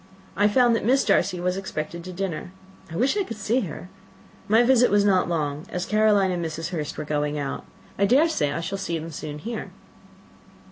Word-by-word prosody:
I 205 +1 +4
found 240 +2 +4
that - - -1
Miss 265 +4 +3
Darcy 185 -2 +2
was 180 +1 -1
expected 170 -3 -5
to 185 - -6
dinner: 180 -2 -4 0.4
I - - -6
wish 255 - +2
I 410 - +1
could 230 - -7
see 215 +4 +1
her. 180 - -6 0.6
My 225 +3 +5
visit 250 0 +5
was 205 0 +3
not 185 -3 +3
long, 150 -2 -2
as 180 0 -3
Caroline 210 -3 +3
and 175 -1 -2
Mrs. 160 +1 -4
Hurst 155 -5 -4
were - - -4
going 150 0 -1
out. 140 -2 -4 0.3
I 200 - +4
dare 280 +9 +5
say 150 - 0
I 165 - -3
shall 195 +3 -4
soon 165 -3 -4
see 155 - -6
them 150 - -6
here." 225 +7 -5
185 Hz, 205 wpm, -24 LUFS, 160-215 Hz, 0.6 s, My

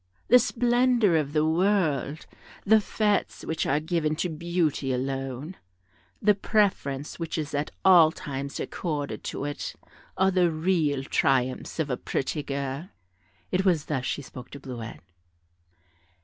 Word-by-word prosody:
The 250 - +8
splendour 240 -4 +3
of 150 -3 +1
the 155 0 +2
world, 160 -4 +1 0.4
the 220 +2 +6
fêtes 210 0 0
which 160 - -1
are 145 - +2
given 155 -1 0
to 175 +3 -1
beauty 160 -4 -1
alone, 135 +5 -3 0.6
the 210 0 +4
preference 190 -10 0
which 165 -1 -3
is 150 -2 -3
at 145 +1 -1 0.2
all 175 -4 +8
times 140 -2 -5
accorded 150 -5 -3
to - - -3
it, 145 0 -4 0.4
are 190 0 +4
the 180 -2 +3
real 155 -4 +1
triumphs 130 -2 0
of 155 -4 -1
a 125 - 0
pretty 150 +3 -2
girl;" 140 +4 -4 0.6
it 185 +1 +1
was 175 -6 +2
thus 135 -4 -2
she 145 - -2
spoke 125 -1 -10
to 140 - -9
Bleuette. 120 -7 -8
155 Hz, 140 wpm, -27 LUFS, 140-185 Hz, 0.6 s, The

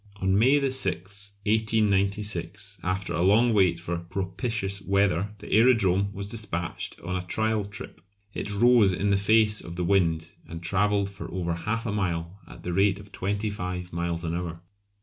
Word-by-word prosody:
On 95 0 +1
May 135 +4 +4
6, 100 -4 +1
1896, 100 -2 0
after 95 +1 -2
a 85 - -1
long 110 +6 +4
wait 90 -5 +3
for 85 0 -3
propitious 95 +3 -2
weather, 100 0 +1
the - - -11
aerodrome 100 -4 +4
was 100 0 -5
despatched 100 -6 -4
on 90 +2 -4
a 90 - -1
trial 110 +3 -1
trip. 105 -5 -8 0.3
It 105 - -3
rose 110 -1 +5
in 100 +3 0
the - - +4
face 105 +1 +3
of 85 - -8
the 90 - -2
wind 85 -4 +1 0.2
and 85 +1 -8
travelled 100 +2 +1
for 100 +1 -8
over 85 -2 -2
half 110 +7 -3
a 110 - -1
mile 90 -2 -2
at - - -13
the 90 - -3
rate 100 +1 +3
of 100 0 -13
twenty 100 +3 -2
five 90 -2 -5
miles 85 0 -2
an 85 0 -2
hour. 85 -1 -4
100 Hz, 170 wpm, -26 LUFS, 90-105 Hz, 0.3 s, rose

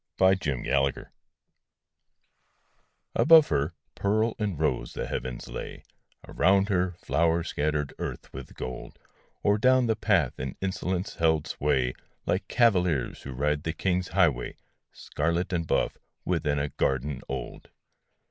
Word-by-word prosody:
A 95 +1 +6
MEMORY 70 -1 0 2.1
Above 160 -1 +7
her, 70 +2 0 0.2
pearl 110 +3 +1
and 100 -8 -2
rose 75 -6 0
the - - -3
heavens 65 -2 -5
lay: - - -7 0.4
Around 95 +3 +3
her, 90 -2 +1
flowers 85 0 +1
scattered 75 -1 -1
earth - - -6
with 65 0 -9
gold, 65 0 -7 0.5
Or 105 +1 +3
down 130 +2 +4
the 110 -1 +1
path 95 - +1
in 65 -1 -4
insolence 95 0 -2
held 80 -2 +2
sway 65 -4 0 0.3
Like - - -1
cavaliers 90 - +2
who 65 - -7
ride 75 +3 0
the 80 +1 -3
king's 90 +1 0
highway 85 -8 +1 0.4
Scarlet 85 +3 -2
and 85 -2 -1
buff, - - 0 0.3
within 80 -5 0
a 70 +1 -1
garden 65 0 -1
old. 65 -2 -6
85 Hz, 130 wpm, -27 LUFS, 70-95 Hz, 2.1 s, Above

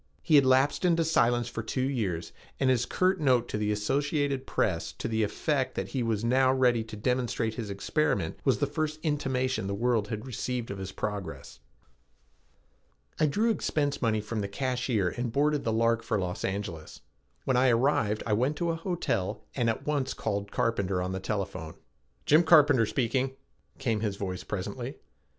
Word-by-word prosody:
He - - 0
had 140 -3 +7
lapsed 130 +5 +3
into 170 -2 +3
silence 120 -6 +2
for 110 - -4
two 130 +4 -1
years 95 -11 -2 0.3
and 130 -1 +3
his 120 -1 +1
curt 185 +5 +1
note 130 -5 +3
to - - -2
the 105 0 0
Associated 135 +5 0
Press 85 -5 0
to - - -4
the 110 -1 0
effect 130 +6 0
that - - -3
he 130 - -2
was 115 -2 -1
now 130 +2 +4
ready 125 -3 +3
to 110 - -8
demonstrate 120 0 -1
his 110 -2 -5
experiment 100 - -1
was - - +3
the - - +1
first 155 0 -2
intimation 130 - 0
the 100 - -2
world 115 -1 +1
had 110 +2 -5
received 125 -1 -3
of 100 - -6
his 95 0 -5
progress. 105 -2 -5 1.6
I 155 - +4
drew 215 +10 +2
expense 145 -8 -1
money 110 -3 +1
from 105 +1 -3
the 100 - -2
cashier 125 -3 0
and 120 +2 -3
boarded 145 +3 +1
the 115 - +1
Lark 115 +1 +2
for 115 - -1
Los 90 -2 -3
Angeles. 95 -5 -4 0.4
When 130 - +2
I 130 +1 +4
arrived 115 -3 +2
I 105 - 0
went 130 +8 +1
to 170 +1 0
a - - -2
hotel 115 - -2
and 120 -3 +1
at 115 - -2
once 145 -3 -1
called 100 -2 -3
Carpenter 100 -5 0
on 90 +1 -2
the 95 - -3
telephone. 95 -5 -4 0.5
"Jim 155 +3 +6
Carpenter 145 -8 +5
speaking," 130 +2 0 0.4
came 115 -5 0
his 105 -2 -2
voice 95 -2 -4
presently. - - -5
120 Hz, 180 wpm, -28 LUFS, 105-135 Hz, 1.6 s, had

